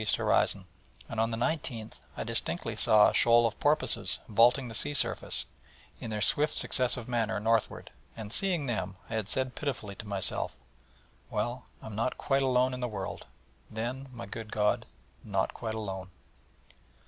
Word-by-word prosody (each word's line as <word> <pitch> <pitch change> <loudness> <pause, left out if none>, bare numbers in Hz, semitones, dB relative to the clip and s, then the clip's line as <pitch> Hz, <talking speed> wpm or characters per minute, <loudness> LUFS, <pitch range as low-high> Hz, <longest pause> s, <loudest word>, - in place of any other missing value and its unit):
horizon; - - +1 0.4
and 115 - -5
on 115 +1 +1
the 115 - -3
19th 125 -4 -3 0.2
I - - -3
distinctly - - -2
saw 105 -1 +5
a - - 0
shoal 120 0 +5
of 115 - -2
porpoises 150 +1 +1
vaulting 120 +4 +3
the 115 - -8
sea 145 +6 +1
surface, - - +4 0.5
in - - -7
their 105 -2 -2
swift 150 +7 +7
successive 125 -2 +2
manner, 115 -3 -1
northward: 115 +1 -1 0.3
and 105 -2 -7
seeing 175 -1 +1
them, 100 -6 -3 0.2
I - - -4
had 110 -3 -2
said 130 +3 -1
pitifully 125 -8 -4
to 105 - -9
myself: 100 -2 -1 0.7
'Well, 120 +4 -3 0.2
I - - -10
am 110 - -8
not 115 +4 -2
quite 135 -1 0
alone 130 -1 +2
in 125 - -5
the 125 - -2
world, 100 -3 -6 0.4
then, 125 +5 -5
my 120 -4 -8
good 110 +2 -8
God 105 -1 0 0.4
not 100 -2 -1
quite 110 -2 -5
alone.' 95 -4 -6
115 Hz, 165 wpm, -29 LUFS, 105-130 Hz, 0.7 s, swift